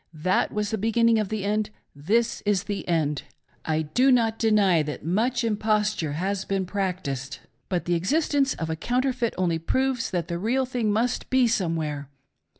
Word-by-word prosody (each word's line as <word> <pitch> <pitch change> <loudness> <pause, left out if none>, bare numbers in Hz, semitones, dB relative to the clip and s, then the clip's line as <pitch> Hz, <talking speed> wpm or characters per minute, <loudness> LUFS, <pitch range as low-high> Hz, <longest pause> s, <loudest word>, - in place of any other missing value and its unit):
That 185 +5 +1
was 210 -1 -2
the 220 - -1
be 225 +3 0
ginning 230 0 +4
of 205 - -4
the 215 -2 -3
end; 210 +1 0 0.3
this 225 +11 0
is 205 -2 +1
the 205 -1 -4
end. 150 -4 0 0.4
I 160 0 0
do 250 - +3
not 225 -3 +2
deny 205 -7 +4
that 150 0 -5
much 235 +8 +1
imposture 210 -7 0
has 190 +5 -2
been 195 -1 -1
practiced; 180 -9 -3 0.3
but 180 -2 -1
the 175 - 0
existence 275 - +1
of 160 0 -3
a - - -1
counter 250 +10 0
feit 240 -3 -2
only 170 -3 +1
proves 260 +7 0
that 175 -3 -2
the 170 0 -3
real 250 +7 +1
thing 245 -4 -1
must 235 +4 0
be 260 -1 +4
somewhere. 160 - -1
205 Hz, 180 wpm, -25 LUFS, 170-230 Hz, 0.4 s, ginning